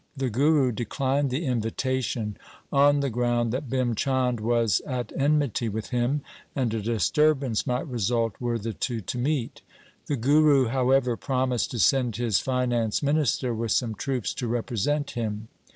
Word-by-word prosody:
The 135 -2 -1
Guru 140 +2 +3
declined 135 +5 -1
the 140 +7 -2
invita 130 +1 -1
tion 105 -3 -3 0.4
on 145 +1 +5
the 140 - 0
ground 120 0 0
that 130 +1 -3
Bhim 125 -2 0
Chand 130 -1 0
was 115 -1 +2
at 125 -4 -3
enmity 140 -5 +1
with 110 +3 -5
him 125 +4 0 0.3
and 125 -5 0
a 110 - -1
disturbance 130 +2 +1
might 125 +3 -1
result 115 -2 0
were 120 -1 -1
the 115 0 -4
two 115 +1 -3
to 100 - -5
meet. 135 -2 -2 0.5
The 145 - 0
Guru, 140 0 +4
however, 130 -1 +2
promised 130 -2 0
to 120 - -5
send 125 -1 +2
his 115 -4 +1
finance 125 -3 0
minister 140 -4 +1
with 115 0 -1
some 115 -3 0
troops 120 +2 -2
to 125 - -4
represent 120 +5 -1
him. 110 -1 -4
125 Hz, 160 wpm, -26 LUFS, 115-135 Hz, 0.5 s, on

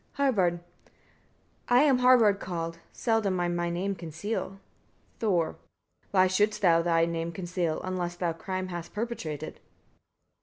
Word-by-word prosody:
Harbard. 190 -11 +1 1.1
10. 245 - +4
I - - +7
am 270 -4 +4
Harbard 240 -5 +5
called; 165 -3 -4
seldom 220 -5 0
I 175 - +1
my 175 0 -1
name 185 +4 -1
conceal. 190 +4 -5 0.6
Thor. 185 -7 +2
11. - - -12 0.5
Why 185 -2 +4
shouldst 210 +3 +1
thou 165 -2 +5
thy 165 -1 +3
name 165 0 -3
conceal, 175 -2 -2
unless 180 -2 -3
thou 175 -1 -1
crime 185 +2 -4
hast 175 0 -7
perpetrated? 210 -10 -4
185 Hz, 140 wpm, -28 LUFS, 170-210 Hz, 1.1 s, I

